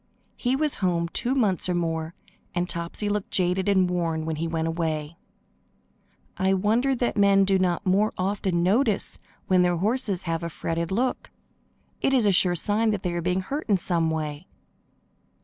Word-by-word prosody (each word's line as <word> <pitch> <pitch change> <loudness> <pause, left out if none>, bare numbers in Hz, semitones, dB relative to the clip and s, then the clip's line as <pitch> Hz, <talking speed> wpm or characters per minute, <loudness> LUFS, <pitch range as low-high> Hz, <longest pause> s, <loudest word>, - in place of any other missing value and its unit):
He 250 +1 0
was 300 +1 +1
home 170 -2 0
two 250 +9 0
months 200 -8 +1
or 180 - +1
more, 165 -1 -2 0.4
and 175 0 0
Topsy 170 +5 -3
looked 205 -1 -2
jaded 185 +1 +1
and 190 -2 +3
worn 165 -3 -1
when 160 -1 -3
he 165 +2 -2
went 165 -1 -2
away. 160 -2 -2 1.2
I 190 0 +2
wonder 230 +8 +1
that 240 -1 -1
men 200 -1 +5
do 190 0 +2
not 180 +1 0
more 200 +3 +2
often 185 -2 0
notice 215 +3 +1 0.3
when 185 -1 +3
their 175 -1 +2
horses 210 -1 0
have 165 -1 -2
a 170 - -4
fretted 165 +1 -3
look. 250 +6 -1 0.7
It 270 - +2
is 245 -4 +3
a 205 - +4
sure 180 -1 +4
sign 210 +6 +1
that 205 -3 -2
they 180 -2 -1
are 175 - -2
being 180 +2 0
hurt 280 - -5
in 200 - +4
some 170 -2 0
way. 155 +1 -4
185 Hz, 180 wpm, -25 LUFS, 170-205 Hz, 1.2 s, men